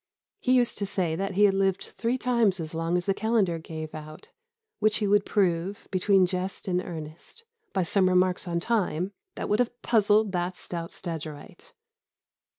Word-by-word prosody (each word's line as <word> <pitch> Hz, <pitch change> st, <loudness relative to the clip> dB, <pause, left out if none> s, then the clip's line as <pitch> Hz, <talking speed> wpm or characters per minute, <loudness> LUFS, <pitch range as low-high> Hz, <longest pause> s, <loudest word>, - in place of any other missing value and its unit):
He 255 Hz, -9 st, +2 dB
used 245 Hz, -2 st, +2 dB
to 200 Hz, -, 0 dB
say 175 Hz, -5 st, -1 dB
that 195 Hz, +2 st, -3 dB
he 205 Hz, -, +4 dB
had 200 Hz, -, +4 dB
lived 195 Hz, -1 st, 0 dB
three 235 Hz, +2 st, 0 dB
times 235 Hz, -7 st, +2 dB
as 160 Hz, -1 st, -5 dB
long 165 Hz, +2 st, 0 dB
as 175 Hz, -, -2 dB
the 195 Hz, -, +2 dB
calendar 205 Hz, -5 st, +1 dB
gave 155 Hz, -1 st, -7 dB
out; 155 Hz, 0 st, -10 dB, 0.5 s
which 215 Hz, 0 st, +3 dB
he 210 Hz, -, 0 dB
would 205 Hz, 0 st, +3 dB
prove, 190 Hz, -1 st, 0 dB
between 190 Hz, 0 st, +4 dB
jest 185 Hz, +2 st, -3 dB
and 180 Hz, -1 st, +1 dB
earnest, 160 Hz, -, -8 dB, 0.3 s
by 190 Hz, -, +1 dB
some 185 Hz, +2 st, +3 dB
remarks 185 Hz, +1 st, +2 dB
on 170 Hz, -1 st, 0 dB
Time, 185 Hz, -3 st, 0 dB, 0.2 s
'That -, -, -4 dB
would 210 Hz, -, +1 dB
have 245 Hz, 0 st, 0 dB
puzzled 215 Hz, -2 st, +3 dB
that 180 Hz, 0 st, -2 dB
stout 170 Hz, -1 st, -5 dB
Stagyrite. 155 Hz, -4 st, -8 dB
185 Hz, 175 wpm, -27 LUFS, 170-210 Hz, 0.5 s, he